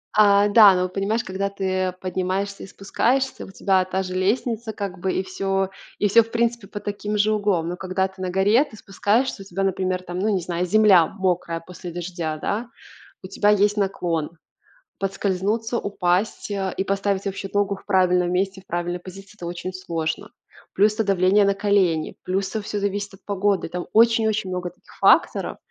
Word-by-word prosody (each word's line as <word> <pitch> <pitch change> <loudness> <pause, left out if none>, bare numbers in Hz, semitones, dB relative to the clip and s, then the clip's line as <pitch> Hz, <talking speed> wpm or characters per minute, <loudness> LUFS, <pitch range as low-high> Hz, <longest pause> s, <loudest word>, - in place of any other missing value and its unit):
А, 205 -1 +5
да, 205 -2 +8
ну, 180 0 0
понимаешь, 200 +5 -1
когда 190 +1 -2
ты 185 -2 -1
поднимаешься 190 +2 -2
и - - -8
спускаешься, 250 +8 -1
у - - -12
тебя 190 -1 +2
та 190 +1 -2
же 185 -1 -6
лестница 220 +4 -1
как 195 -3 -5
бы 190 +1 -1
и 185 - -1
всё 195 0 -1 0.3
и 205 - +2
всё, 230 +4 +6
в 225 - -15
принципе, 235 -2 -1
под 205 +1 -8
таким 210 +1 -3
же 210 +1 +3
углом. 200 -6 0
Но 180 - -4
когда 190 +1 -1
ты 190 0 -14
на 185 - -2
горе, 200 +8 +3
ты 230 -8 -13
спускаешься, 210 +4 0
у - - -10
тебя, 195 +1 -3
например, 185 -1 -1
там, 180 0 -5
ну, 210 +3 +1
не 195 -3 +1
знаю, 175 +1 -2
земля 195 -4 +5
мокрая 180 -4 -2
после 175 +1 -9
дождя, 170 -2 -4
да? 225 +9 -3 0.5
У - - -6
тебя 205 - +1
есть 210 0 +3
наклон. 170 -5 -1 0.6
Подскользнуться, 200 +4 -1
упасть, 200 0 -1
э, 195 -2 -2
и - - -1
поставить 195 0 -1
вообще 195 0 -4
ногу 205 -1 +1
в - - -18
правильном 180 -1 +2
месте, 190 +1 -1
в - - -29
правильной 175 +1 -2
позиции 195 +3 -12
это 175 - -8
очень 175 +2 -5
сложно. 165 -4 -4 0.4
Плюс 210 +2 +3
это 220 - 0
давление 195 +1 +3
на 200 - +3
колени, 195 -5 +1
плюс 195 +1 -1
это 220 - -3
всё 205 0 -4
зависит 205 0 -2
от 195 - -17
погоды. 200 -1 0
Там 175 +1 -5
очень-очень 220 -3 +3
много 180 -1 -3
таких - - -21
факторов, - - +3
195 Hz, 190 wpm, -23 LUFS, 185-205 Hz, 0.6 s, да